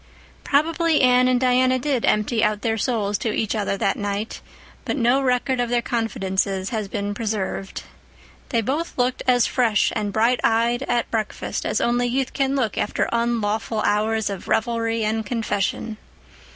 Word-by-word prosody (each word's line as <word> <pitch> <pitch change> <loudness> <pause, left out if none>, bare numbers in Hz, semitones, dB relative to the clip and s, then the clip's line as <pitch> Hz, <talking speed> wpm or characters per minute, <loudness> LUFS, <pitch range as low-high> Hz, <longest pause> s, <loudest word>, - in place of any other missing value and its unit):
Probably 320 +2 +2
Anne 250 0 +5
and 255 -1 +3
Diana 255 0 +3
did 260 -2 0
empty 220 +2 +1
out 210 -1 0
their 225 -2 +1
souls 210 -3 -1
to 225 - -1
each 215 0 -1
other 205 -2 -1
that 195 - 0
night, 205 +1 -3 0.4
but - - -2
no 250 +2 +3
record 255 0 +1
of 245 -1 0
their 240 0 +1
confidences 195 -4 -1
has 215 -3 -2
been 205 +1 -3
preserved. 205 -3 -3 0.7
They 230 -3 +1
both 290 +9 -3
looked 250 0 0
as 245 -2 +4
fresh 225 -5 +2
and 205 -1 -1
bright 230 +4 +2
eyed 235 +2 +2
at 240 -1 0
breakfast 220 -2 -3
as - - 0
only 245 +1 +1
youth 260 +1 -1
can 275 0 0
look 245 -7 -1
after - - 0
unlawful 225 -2 0
hours 215 +1 +1
of 195 - -7
revelry 230 -1 0
and 220 +1 0
confession. 215 -1 -2
230 Hz, 165 wpm, -22 LUFS, 210-250 Hz, 0.7 s, Anne